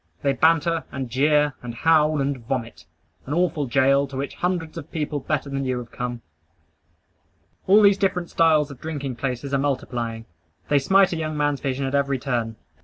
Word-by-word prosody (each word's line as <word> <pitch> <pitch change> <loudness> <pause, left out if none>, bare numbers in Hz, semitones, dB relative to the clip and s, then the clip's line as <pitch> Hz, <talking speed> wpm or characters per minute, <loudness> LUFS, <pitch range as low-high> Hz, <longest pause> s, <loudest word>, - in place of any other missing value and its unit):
They 140 -1 +2
banter, 165 +3 +2
and 130 -2 -5
jeer, 150 +2 +3
and 120 -1 -7
howl, 155 +2 +3
and 140 +1 0
vomit. 115 - -5 0.4
An 145 - -2
awful 165 -5 0
goal, 135 +2 +3
to 135 -1 -8
which 140 +1 -3
hundreds 175 -3 -2
of 165 -4 -8
people 150 -2 -2
better 150 +1 -2
than 135 0 -3
you 130 -1 -1
have 120 -1 -8
come. 120 -1 -5 1.4
All 205 +3 +6
these 200 -1 +5
different 180 -3 -1
styles 155 -3 +3
of 135 - -12
drinking 145 -5 -4
places 135 +2 -3
are 140 - +2
multiplying. 120 -5 -2 0.4
They 145 - +4
smite 190 +6 +4
a - - -2
young 155 -1 -3
man's 145 -1 0
vision 135 -1 -2
at 135 - -3
every 140 -1 +1
turn. 120 -3 -2
140 Hz, 180 wpm, -23 LUFS, 130-155 Hz, 1.4 s, All